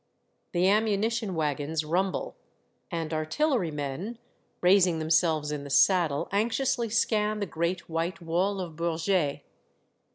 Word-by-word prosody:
The 175 +1 +3
ammunition 215 0 +1
wagons 155 0 -1
rumble, 185 +4 -1 0.5
and 165 -3 -3
artillery 180 - 0
men, 150 - -4 0.4
raising 180 -2 +4
them 160 0 -3
selves 160 -3 +2
in 150 -1 -4
the 140 - -8
saddle, 165 -1 +3
anxiously 235 +3 0
scan 215 -1 +1
the 200 - -1
great 170 0 -2
white 165 +2 -2
wall 180 +4 0
of 170 -3 -6
Bourget. 170 -1 0
175 Hz, 125 wpm, -28 LUFS, 160-200 Hz, 0.5 s, raising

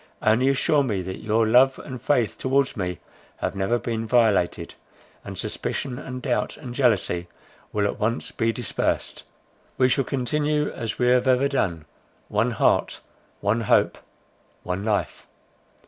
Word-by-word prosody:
Only 115 +5 +4
assure 145 +2 +3
me 105 -9 -1
that 95 +1 -6
your 110 +1 +2
love 130 +4 +5
and 130 -2 -8
faith 120 -9 +1
towards 135 +1 +1
me 90 -5 -3 0.4
have - - -3
never 95 +5 +1
been 115 -1 -3
violated; 110 -6 +2 0.5
and - - -8
suspicion, 130 -3 -3
and 130 -3 -7
doubt, 125 -4 -1
and 125 -5 -8
jealousy 105 -9 +1 0.4
will 105 -1 0
at 100 - -2
once 115 +3 -1
be 115 0 0
dispersed. 120 -2 -2 0.6
We 130 -1 +4
shall 135 +1 +2
continue 150 +4 0
as 115 -2 -4
we 125 0 +2
have 125 +1 +3
ever 130 +2 +4
done, 90 - -1 0.4
one 105 +4 +1
heart, 115 - +1 0.4
one 105 +3 +1
hope, 110 - +2 0.6
one 90 +2 -3
life." 105 -2 -2
120 Hz, 145 wpm, -24 LUFS, 105-130 Hz, 0.6 s, love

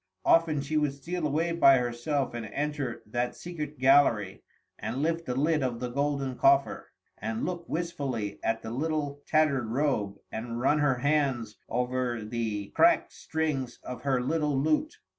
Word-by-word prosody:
Often 160 -3 +4
she 150 +3 -1
would 150 -2 +1
steal 165 +3 -3
away 160 +4 0
by 140 -5 +6
herself 125 +3 -1
and 115 -2 -5
enter 145 -3 -3
that 120 +3 -2
secret 150 -4 -6
gallery, 125 -7 +4 0.4
and 125 +6 -3
lift 165 +1 -1
the 125 - -1
lid 150 +3 +2
of 125 -3 -1
the 125 0 -3
golden 140 0 -1
coffer, 345 0 +3 0.3
and 225 +1 -2
look 175 -2 -5
wistfully 140 -11 -3
at 115 0 0
the 110 - -5
little 145 +1 -2
tattered 150 -6 +2
robe, 115 -5 0
and 115 +1 -4
run 140 +4 +3
her 145 -3 +3
hands 130 -5 0
over 125 -2 -1
the 110 -3 -3
cracked - - +3
strings 150 -6 -2
of 125 -1 -7
her 135 -2 +1
little 150 +1 0
lute. 155 - +1
140 Hz, 160 wpm, -28 LUFS, 120-155 Hz, 0.4 s, by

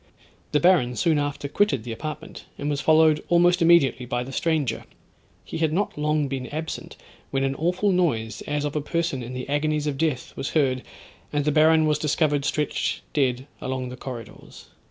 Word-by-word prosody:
The 150 - +3
baron 150 -8 +4
soon 160 -1 +2
after 145 0 -3
quitted 150 - +1
the 120 - -6
apartment, 155 +6 -7
and 145 +1 -2
was 145 0 -1
followed 155 -1 +4
almost 175 +1 +4
immediately 165 -7 +4
by 120 +1 -1
the 130 - -8
stranger. 145 -5 -1 0.6
He - - -5
had 160 -2 +2
not 195 +5 -1
long 150 -1 0
been 130 -2 -4
absent, 155 +2 -6 0.3
when 135 0 0
an 135 0 +1
awful 180 +7 +1
noise, 115 - 0
as 150 0 -1
of 145 - -3
a 150 - 0
person 165 -3 -1
in 125 +2 -7
the 125 - -5
agonies 150 +1 0
of 140 -2 -2
death, 150 -6 -1
was 135 - -3
heard, 130 -4 +2 0.5
and 145 -1 0
the 150 - +3
Baron 155 +1 +5
was 150 -1 +1
discovered 150 -1 +1
stretched 150 -1 -1
dead 130 -3 +1 0.2
along 130 -1 -3
the 125 - -7
corridors. 125 -3 -10
150 Hz, 185 wpm, -24 LUFS, 130-160 Hz, 0.6 s, Baron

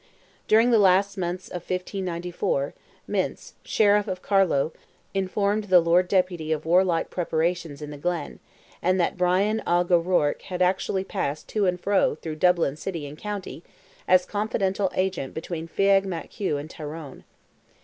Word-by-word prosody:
During 225 +3 +5
the 230 - +5
last 195 0 +4
months 180 -1 -3
of 180 - -6
1594, 180 -6 -2 0.3
Mynce, - - -2
Sheriff 205 -1 +3
of 185 -2 -4
Carlow, 180 -7 +2 0.4
informed 200 +2 0
the 185 -3 +6
Lord 175 +2 +3
Deputy 180 -4 0
of 155 -1 -1
warlike 175 0 +2
preparations 165 -3 -1
in 150 - -7
the 145 - -9
Glen, 175 -1 -3 0.4
and 185 +1 +2
that 175 - +1
Brian 190 +4 +2
Oge 175 +1 +2
O'Rourke 170 -4 +2
had 180 -2 -6
actually 190 +1 0
passed 155 -7 -3
to 210 -3 +1
and 180 0 0
fro 195 -4 +2
through 155 0 -6
Dublin 170 -4 +2
city 165 -2 -5
and 145 +1 -8
county, 205 -5 -6 0.5
as 185 0 +5
confidential 200 -2 -1
agent 185 -8 -2
between 165 0 -5
Feagh 195 +3 +3
Mac 175 -4 -5
Hugh 185 -8 -2
and 145 +2 -6
Tyrone. 150 -2 -8
180 Hz, 150 wpm, -25 LUFS, 165-195 Hz, 0.5 s, the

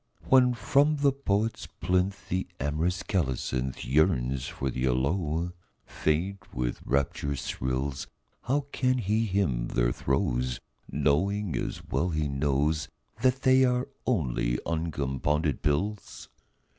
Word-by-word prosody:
When 125 -2 +5
from 145 +6 +3
the 140 -1 +4
poet's 115 -5 -1
plinth 95 +2 0
The 95 +1 -1
amorous 80 +6 0
colocynth 65 -7 -1
Yearns 65 -3 +2
for 65 -1 -3
the 65 +1 -1
aloe, 80 +6 0 0.3
faint 95 +5 -1
with 60 -1 -2
rapturous 70 0 -1
thrills, 65 +2 -2 0.4
How 135 +4 +2
can 130 0 +1
he 110 0 +1
hymn 90 -12 0
their - - +1
throes 65 -1 0 0.3
Knowing, 100 +6 +1
as - - -3
well 70 +8 0
he 75 -2 0
knows, 70 +2 0 0.3
That 130 +1 +2
they 130 0 +6
are 125 0 +1 0.2
only 65 - +1
uncompounded 75 -2 -1
pills? 100 +9 -2
80 Hz, 120 wpm, -28 LUFS, 65-100 Hz, 0.4 s, they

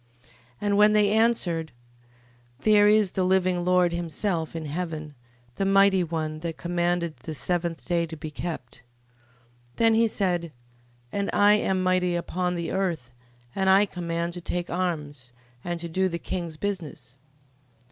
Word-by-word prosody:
15:4. - - -23 0.3
And 205 -1 +1
when 210 +1 +6
they 210 -1 +4
answered: 205 -8 +1 0.9
There 210 -1 +5
is 210 -2 +4
the 190 - 0
living 185 -1 +2
Lord 180 -1 +3
himself 170 0 -2
in 160 -1 -4
heaven, 155 -1 -4 0.4
the - - 0
mighty 195 -1 +4
One, 155 -2 -3
that 165 0 -5
commanded 175 -2 -1
the 140 +6 -7
seventh 170 0 -2
day 170 -2 0
to 160 0 -8
be 155 0 -7
kept. 150 -7 -6 1.0
15:5. - - -33
Then 225 -1 +4
he 225 +1 +4
said: 175 -6 -1 0.6
And 200 0 -2
I 205 0 +5
am 190 -3 +1
mighty 185 -1 +1
upon 180 +1 -2
the 170 -1 -3
earth, 170 -10 -2 0.4
and 190 0 +1
I 195 +2 +6
command 170 -2 -3
to 175 - -7
take 175 +1 -3
arms, 150 -8 -3 0.3
and 175 -1 -3
to 170 - -4
do 185 +3 0
the 170 - -3
king's 170 -3 -5
business. 155 -10 -5
175 Hz, 155 wpm, -26 LUFS, 165-190 Hz, 1.0 s, when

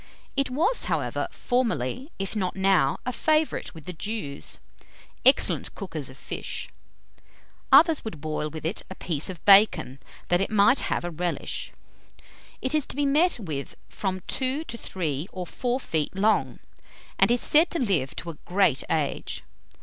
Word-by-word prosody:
It 275 -1 +1
was, 335 - +1
however, - - -1
formerly, 245 - -1
if 195 +2 -4
not 185 -4 -1
now, 190 -7 +3
a 250 - -1
favourite 310 - 0
with 160 -2 -11
the 180 - -5
Jews, 170 -5 -3 0.7
excellent - - +4
cookers - - -5
of - - -13
fish. - - -5 1.0
Others 325 -3 +6
would 195 -9 -6
boil 155 0 -3
with 155 +1 -8
it 170 +6 -2
a 190 - -7
piece 160 -4 -2
of 180 -4 -8
bacon, 190 -10 +6 0.3
that 175 +1 +3
it 195 - 0
might 215 +4 +4
have - - -1
a 175 - -3
relish. 175 +1 -3 0.9
It 260 - 0
is 305 -2 +1
to - - -2
be 290 0 +1
met 310 +6 +3
with 155 - -5
from 185 -2 -3
two 265 +3 0
to 235 - -6
three 165 -8 -3
or 185 -1 -5
four 245 +7 -2
feet 160 - -2
long, 210 +3 +2 0.6
and - - +5
is 240 +1 +3
said 315 +3 +5
to 340 - -1
live 165 - 0
to 170 - -5
a 155 - -16
great 180 -7 +2
age. 155 -4 -2
195 Hz, 165 wpm, -26 LUFS, 160-255 Hz, 1.0 s, Others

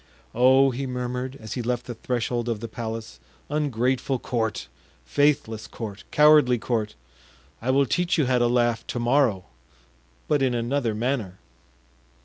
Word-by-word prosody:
"Oh!" 130 +3 +5
he 135 +2 -4
murmured, 125 +1 -4
as 110 -2 -7
he 125 - -3
left 120 0 -2
the 120 - -5
threshold 120 0 -2
of 115 -3 -2
the 115 - -5
palace: 110 - -6 0.3
"ungrateful 135 -2 0
court! 115 - -2 0.4
faithless 125 - +1
court! 105 -4 -8
cowardly 150 -4 +5
court! 110 -2 -2 0.7
I 120 - -3
will 135 +1 +4
teach 175 +6 0
you 155 - +3
how 125 0 +2
to 120 - +3
laugh 120 -2 +1
to 120 - -3
morrow—but 65 - -2
in 130 -2 +1
another 120 -1 -1
manner." 110 -5 -2
120 Hz, 140 wpm, -25 LUFS, 110-130 Hz, 0.7 s, Oh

